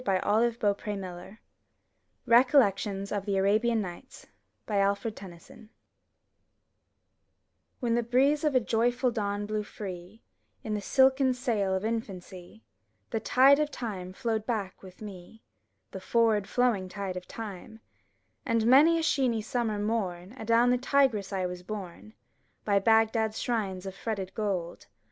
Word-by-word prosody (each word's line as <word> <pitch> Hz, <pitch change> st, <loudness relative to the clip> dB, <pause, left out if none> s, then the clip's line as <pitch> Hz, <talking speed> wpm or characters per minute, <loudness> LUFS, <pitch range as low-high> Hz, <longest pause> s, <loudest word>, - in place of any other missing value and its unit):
55 190 Hz, -6 st, 0 dB
MY 225 Hz, +3 st, +2 dB
BOOK 205 Hz, -1 st, 0 dB
HOUSE 195 Hz, -1 st, -6 dB, 0.9 s
RECOLLECTIONS 225 Hz, -6 st, +3 dB
OF 205 Hz, -2 st, -2 dB
THE 200 Hz, -1 st, 0 dB
ARABIAN 215 Hz, +4 st, +2 dB
NIGHTS 190 Hz, +7 st, -9 dB, 0.4 s
Alfred 200 Hz, +1 st, 0 dB
Tennyson 190 Hz, +3 st, -13 dB, 2.1 s
When 240 Hz, -3 st, 0 dB
the 240 Hz, -, +2 dB
breeze 265 Hz, +6 st, +2 dB
of 300 Hz, -3 st, +1 dB
a -, -, +6 dB
joyful 240 Hz, +2 st, +1 dB
dawn 205 Hz, -2 st, -2 dB
blew 215 Hz, 0 st, -2 dB
free 195 Hz, 0 st, -9 dB, 0.4 s
In 215 Hz, -, -3 dB
the 210 Hz, -, -2 dB
silken 265 Hz, +3 st, +3 dB
sail 215 Hz, -6 st, 0 dB
of 190 Hz, +3 st, -2 dB
infancy, 195 Hz, -3 st, -6 dB, 0.5 s
The 225 Hz, -, -1 dB
tide 270 Hz, +5 st, +5 dB
of 300 Hz, -1 st, +1 dB
time 200 Hz, -9 st, -6 dB
flowed 220 Hz, +1 st, -2 dB
back 210 Hz, -6 st, -3 dB
with 190 Hz, +2 st, -13 dB
me, 200 Hz, +2 st, -11 dB, 0.5 s
The 190 Hz, -, -7 dB
forward 215 Hz, -2 st, +1 dB
flowing 230 Hz, -7 st, +1 dB
tide 195 Hz, -1 st, -5 dB
of 180 Hz, 0 st, -7 dB
time; 220 Hz, 0 st, -8 dB, 0.6 s
And 230 Hz, -1 st, 0 dB
many 290 Hz, +7 st, +6 dB
a 325 Hz, -, -1 dB
sheeny 250 Hz, -8 st, +1 dB
summer 225 Hz, -2 st, -2 dB
mom, 205 Hz, -3 st, -3 dB
Adown 235 Hz, 0 st, +2 dB
the 250 Hz, -, +2 dB
Tigris 255 Hz, -7 st, +1 dB
I 190 Hz, -2 st, -1 dB
was 180 Hz, 0 st, -5 dB
borne, 200 Hz, +2 st, -8 dB, 0.5 s
By 200 Hz, -1 st, +3 dB
Bagdad*s 220 Hz, +1 st, +2 dB
shrines 195 Hz, -6 st, -2 dB
of 190 Hz, -, -5 dB
fretted 195 Hz, -2 st, -5 dB
gold. 190 Hz, -6 st, -3 dB
215 Hz, 140 wpm, -28 LUFS, 195-235 Hz, 2.1 s, a